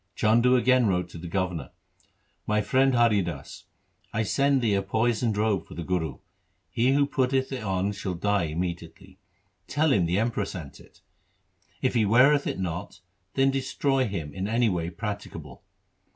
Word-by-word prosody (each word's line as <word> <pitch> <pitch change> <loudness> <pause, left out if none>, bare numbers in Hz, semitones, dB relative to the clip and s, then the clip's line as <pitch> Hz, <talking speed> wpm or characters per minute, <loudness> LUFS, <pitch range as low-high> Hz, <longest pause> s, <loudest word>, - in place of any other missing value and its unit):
Chandu 120 +4 +4
again 125 -1 +4
wrote 90 -2 0
to 85 - -10
the 85 - -7
governor, 90 -6 -2 0.4
' - - -44
My 105 0 +2
friend 130 +5 +2
Hari 115 -4 +4
Das, 75 -6 -7 0.5
I 110 -1 0
send 140 +6 +2
thee 110 -3 +2
a 100 - +2
poisoned 110 +2 0
robe 105 -3 0
for - - -11
the 85 - -5
Guru. 80 -4 -2 0.5
He 125 +3 +2
who 140 0 +3
putteth 130 -1 0
it 130 -2 -4
on 95 -1 -1
shall 95 -2 -4
die 100 0 +1
immediately. 85 +1 -6 0.5
Tell 155 -1 +2
him 90 -4 +2
the 90 +3 0
Emperor 110 -2 0
sent 85 -8 -8
it. - - -20 0.8
If - - +2
he 115 - +3
weareth 130 +7 +4
it - - -2
not, 90 0 -5 0.3
then 135 0 +3
destroy 135 -1 0
him 80 -8 -5
in 95 +1 -3
any 115 +1 +2
way 85 -3 -2
practicable. 100 - -7
105 Hz, 170 wpm, -26 LUFS, 90-125 Hz, 0.8 s, Chandu